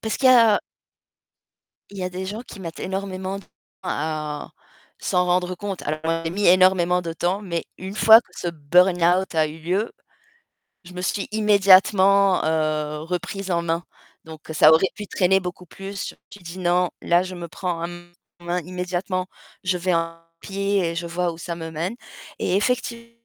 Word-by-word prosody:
Parce 220 - -2
qu'il 260 -1 +4
y - - +8
a 230 -4 +6 1.3
il 200 - -10
y - - -3
a 180 - -2
des 185 +1 -5
gens 210 +4 -5
qui 235 - -12
mettent 165 -3 -7
énormément 190 0 -4
de - - -11
temps - - -31 0.4
à 150 -1 -3 0.5
s'en 180 0 +1
rendre 180 0 +1
compte. 195 0 -5
Alors 160 +2 -2
j'ai 165 - -2
mis 200 +4 0
énormément 180 -1 +4
de 165 -1 -4
temps, 180 +5 -1
mais 170 -4 -3
une 190 +2 -7
fois 220 +1 +8
que - - -30
ce 175 - -3
burn-out 175 +3 +2
a 160 -1 +3
eu 155 +1 -9
lieu. 185 +8 -1 0.9
Je 180 +1 -13
me 180 - -5
suis 195 +2 -2
immédiatement, 200 -2 +5
heu, 155 -1 0
reprise 180 +3 -4
en 170 -1 +1
main 170 0 -1 0.4
donc 160 -1 -11
ça 155 0 +7
aurait 165 +4 +4
pu 210 - -7
traîner 190 0 +2
beaucoup 180 -1 -7
plus. 195 +3 -7 0.2
J'ai 205 - -12
dit: 170 +1 -9
«Non, 180 0 +2
là, 175 +1 +4
je 185 0 -6
me 175 -1 -7
prends 170 -1 -4
en 175 0 -9 0.4
main 175 +1 -2
immédiatement. 180 +1 -3 0.4
Je 185 -1 0
vais 180 +1 0
en 165 0 -1 0.2
pied 200 +1 -1
et 165 - -5
je 170 +1 -3
vois 175 +1 -1
où 165 - -10
ça 170 +1 -5
me 165 -1 -6
mène». 165 +7 -3 0.4
Et - - 0
effectivement 235 +2 -1
180 Hz, 185 wpm, -23 LUFS, 170-195 Hz, 1.3 s, y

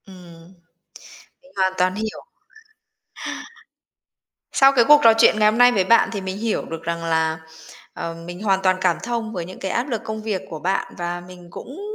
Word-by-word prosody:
Ừm, 175 -2 -15 0.9
mình 275 - -21
hoàn 190 -1 +2
toàn 185 +1 +1
hiểu. 220 0 -5 2.3
Sau 270 0 +6
cái 240 -4 +4
cuộc 295 0 +7
trò 225 - +8
chuyện 220 - +5
ngày 210 0 +5
hôm 220 - -3
nay 245 0 +7
với 200 -6 +2
bạn 230 +5 +4
thì 200 - -4
mình 190 0 -5
hiểu 225 +1 -2
được 165 0 -7
rằng 170 0 -3
là, 160 -1 0 0.6
ờ, 165 - -5
mình 175 +2 -8
hoàn 195 -2 +1
toàn 185 -1 +3
cảm 180 -3 +2
thông 230 -2 -3
với 175 -5 -4
những 185 +2 -10
cái 190 - -4
áp 245 +5 -1
lực 230 -5 -2
công 220 0 -5
việc 210 -4 -3
của 160 - -6
bạn 190 +5 -2
và 175 0 -3
mình 180 0 -13
cũng 280 - -10
190 Hz, 195 wpm, -21 LUFS, 175-225 Hz, 2.3 s, trò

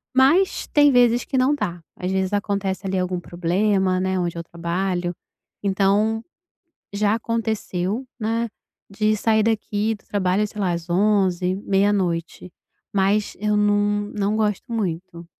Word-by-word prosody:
Mas 310 +9 +3
tem 290 -1 +5
vezes 245 -1 +4
que 265 - -2
não 265 +3 +3
dá, 175 -9 -4 0.2
às 180 +1 -3
vezes 190 0 0
acontece 200 -2 -1
ali 190 0 0
algum 180 0 -1
problema, 185 +2 +1
né, 190 0 0
onde 170 -1 -2
eu 170 - -4
trabalho. 175 +1 -2 0.5
Então, 200 +3 +2 0.7
já 205 +1 +2
aconteceu, 220 -1 -2
né, 230 +2 0 0.4
de 215 +2 +1
sair 220 +1 +2
daqui 215 -1 0
do - - -27
trabalho, 200 +1 +1
sei 210 0 -8
lá, 185 -3 +1
às 170 0 -5
23h, 185 -2 +2
meia-noite, 190 -4 0 0.4
mas 200 +2 +1
eu 210 0 +1
não 205 0 +1
não 205 +1 0
gosto 215 +2 -1
muito. 175 -5 -3
200 Hz, 140 wpm, -22 LUFS, 185-215 Hz, 0.7 s, tem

